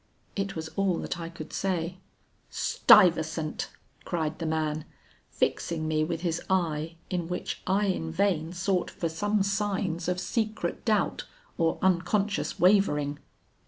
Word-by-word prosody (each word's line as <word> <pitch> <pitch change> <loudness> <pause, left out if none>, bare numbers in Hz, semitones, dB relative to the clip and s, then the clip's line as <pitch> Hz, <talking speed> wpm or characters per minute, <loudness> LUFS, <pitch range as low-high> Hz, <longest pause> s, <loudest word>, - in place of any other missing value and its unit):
It 195 -1 -2
was 160 -1 -4
all 195 -2 +1
that 175 - -4
I 165 0 -5
could 165 -2 -9
say. 180 -1 -1 0.5
'Stuyvesant,' 160 -4 +4 0.3
cried 160 -2 -2
the 165 - -2
man, 155 -1 -1 0.4
fixing 160 -2 -1
me 155 0 +2
with 165 +1 -2
his 170 -2 -1
eye 165 -3 0 0.2
in 175 -2 -1
which 180 +1 -4
I 195 +2 +2
in 170 -4 -1
vain 170 -3 +1
sought 185 0 0
for 165 - -3
some 205 +5 +1
signs 195 -4 -1
of 180 0 0
secret 220 +2 -2
doubt - - +1 0.3
or 165 -1 +1
unconscious 190 +3 +1
wavering. 150 -7 +3
175 Hz, 135 wpm, -28 LUFS, 160-195 Hz, 0.5 s, Stuyvesant